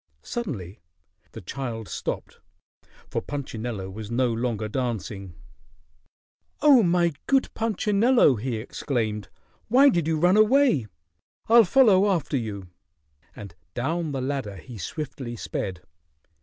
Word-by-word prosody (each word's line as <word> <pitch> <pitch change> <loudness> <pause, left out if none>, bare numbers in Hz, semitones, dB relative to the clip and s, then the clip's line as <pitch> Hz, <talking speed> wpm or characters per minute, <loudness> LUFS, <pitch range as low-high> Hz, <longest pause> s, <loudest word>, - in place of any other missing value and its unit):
Suddenly 110 - -5 0.5
the - - -8
child 115 -6 -5
stopped, - - -5 0.7
for - - -2
Punchinello 120 -8 -5
was 105 +1 -8
no 120 0 +1
longer 115 -2 -2
dancing. 105 -6 -4 1.2
"Oh, 280 -5 +7
my 175 -2 +2 0.2
good 270 -1 +2
Punchinello!" 220 - +3
he 120 +3 -3
exclaimed. 110 -2 -3 0.4
"Why 270 +5 +6
did 170 - 0
you 160 -1 +1
run 180 +5 +4
away? 215 - +4 0.6
I'll 230 0 +7
follow 205 -2 +5
after 165 -6 0
you," 100 -7 -4 0.7
and 100 -4 -9 0.2
down 160 +5 -1
the 135 -2 -3
ladder 130 -6 -3
he 105 +6 -10
swiftly 130 - -5
sped. 95 -4 -4
130 Hz, 115 wpm, -25 LUFS, -, 1.2 s, Oh